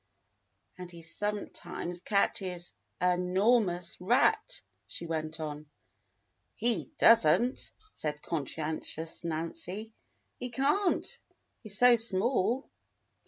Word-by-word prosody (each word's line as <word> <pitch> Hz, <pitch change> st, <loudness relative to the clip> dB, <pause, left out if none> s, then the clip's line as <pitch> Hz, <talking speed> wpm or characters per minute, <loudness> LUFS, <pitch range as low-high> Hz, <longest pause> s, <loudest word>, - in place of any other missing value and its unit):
And 180 Hz, -1 st, -7 dB
he 170 Hz, -1 st, -11 dB
sometimes 180 Hz, -2 st, -4 dB
catches 185 Hz, -4 st, -1 dB, 0.3 s
a 180 Hz, 0 st, +3 dB
'normous 180 Hz, -1 st, +2 dB
rat," 425 Hz, -, +2 dB
— -, -, -44 dB
she 170 Hz, -, -6 dB
went 160 Hz, -1 st, -3 dB
on. 150 Hz, -1 st, -5 dB, 0.9 s
"He 210 Hz, -, 0 dB
does 230 Hz, -7 st, +7 dB
n't," 240 Hz, +11 st, +2 dB, 0.2 s
said 150 Hz, -1 st, -3 dB
conscientious 160 Hz, +1 st, -4 dB
Nancy. 170 Hz, +6 st, -4 dB, 0.5 s
"He 250 Hz, -, -4 dB
can't, 290 Hz, -, +1 dB, 0.5 s
he's 205 Hz, -2 st, -4 dB
so 245 Hz, 0 st, +7 dB
small." 230 Hz, +3 st, +1 dB
180 Hz, 100 wpm, -31 LUFS, 165-230 Hz, 0.9 s, does